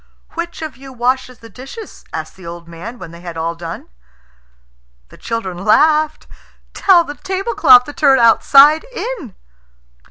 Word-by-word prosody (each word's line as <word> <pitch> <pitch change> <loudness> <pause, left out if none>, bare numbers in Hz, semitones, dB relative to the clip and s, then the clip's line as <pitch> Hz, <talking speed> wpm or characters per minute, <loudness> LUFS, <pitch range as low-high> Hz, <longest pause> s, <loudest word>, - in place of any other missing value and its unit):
"Which 340 -1 -6
of 300 -6 -7
you 270 0 -12
washes 255 0 -2
the 230 - -15
dishes?" 270 - -11
asked - - -6
the 185 -3 -13
old 170 0 -9
man, 180 +9 -9
when 175 -7 -10
they 170 0 -13
had 170 -2 -8
all 165 +1 -2
done. 165 0 -8 1.2
The - - -16
children 210 -6 -5
laughed. 305 +8 +2 0.5
"Tell 365 -3 +4
the 290 - -7
tablecloth 380 - +3
to 290 - -10
turn 285 -5 +3
outside 275 +6 +5
in." 475 - -7
255 Hz, 150 wpm, -17 LUFS, 185-310 Hz, 1.2 s, outside